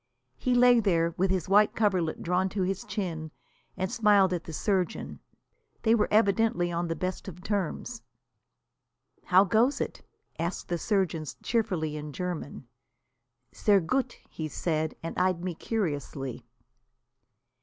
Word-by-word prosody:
He 250 -1 +1
lay 245 -1 +6
there, 170 -6 +2
with 190 +2 +1
his 185 -3 0
white 205 +2 +4
coverlet 185 -7 0
drawn 180 +2 +1
to 190 - +2
his 190 +1 -2
chin, 175 -6 -4 0.5
and 190 0 -2
smiled 205 -5 +4
at 170 -2 -3
the - - -7
surgeon. 185 +3 -1 0.6
They 225 - +4
were 230 - +3
evidently 205 -4 +2
on 170 0 -1
the 165 - -2
best 185 +2 -4
of 180 -1 -9
terms. 205 +3 -3 1.2
"How 185 +1 +6
goes 225 +8 +2
it?" - - -4 0.4
asked 170 +2 -3
the 175 -1 -1
surgeon 185 -7 0 0.2
cheerfully 180 -10 -1
in 150 -1 -7
German. 175 -7 -5 0.8
"Sehr 205 -2 +3
gut," 255 +9 -1
he 155 - -5
said, 155 0 -2
and 165 - -4
eyed 180 -1 +1
me 180 -1 -2
curiously. 145 - -3
185 Hz, 140 wpm, -28 LUFS, 165-210 Hz, 1.2 s, lay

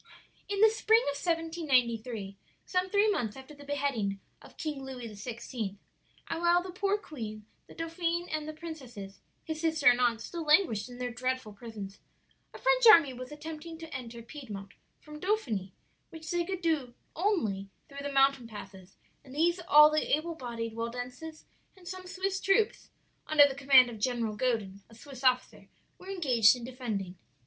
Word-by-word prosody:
"In 400 0 -1
the 440 - +8
spring 445 +1 +3
of - - -6
1793 255 - 0 0.3
some 365 0 0
three 410 +2 +3
months 225 - -2
after 265 +3 -11
the 285 -1 -13
beheading 275 -9 -1 0.2
of - - -16
King 295 -4 -4
Louis 260 -2 -7
XVI. 220 -1 -5 0.5
and 330 0 -3
while 345 +1 +4
the 370 - -7
poor 395 +3 0
queen, 220 - -8 0.2
the - - -14
dauphin 335 +1 -2
and 310 -1 -2
the 310 - -5
princesses, 260 -12 -9 0.2
his 315 -1 -5
sister 320 -3 0
and 245 - 0
aunt, 235 -2 +2
still 340 +8 -6
languished 300 - +3
in 245 - -10
their 250 0 -3
dreadful 255 -2 -3
prisons 205 -2 -9 0.5
a - - -10
French - - +4
army 330 -11 +8
was 255 +1 -8
attempting 315 +2 -8
to 325 0 -10
enter 235 -2 -7
Piedmont 220 -7 -8 0.3
from 300 0 -11
Dauphiny, 250 - -1 0.4
which 320 -2 -8
they 345 0 +1
could 375 0 -4
do 295 -8 0 0.2
only 225 - 0 0.2
through 280 0 -8
the 285 0 -4
mountain 270 -3 +3
passes; 195 -3 -11 0.3
and 265 -1 -12
these 340 +4 +2
all 300 +1 +8
the 305 -1 +2
able 335 +2 -5
bodied 235 -6 -5
Waldenses 250 +7 -6 0.3
and 360 -2 -16
some 370 0 -7
Swiss 385 +1 -2
troops, 415 +2 +1 0.4
under 295 -2 +7
the 275 - -4
command 270 -2 +6
of 230 -3 -8
General 230 -2 -1
Godin, 215 -5 -1
a 225 - -16
Swiss 270 +1 -11
officer, 255 -1 +1 0.3
were 370 - -11
engaged 255 - +4
in 245 - -9
defending. 220 -8 -4
275 Hz, 170 wpm, -30 LUFS, 230-330 Hz, 0.5 s, the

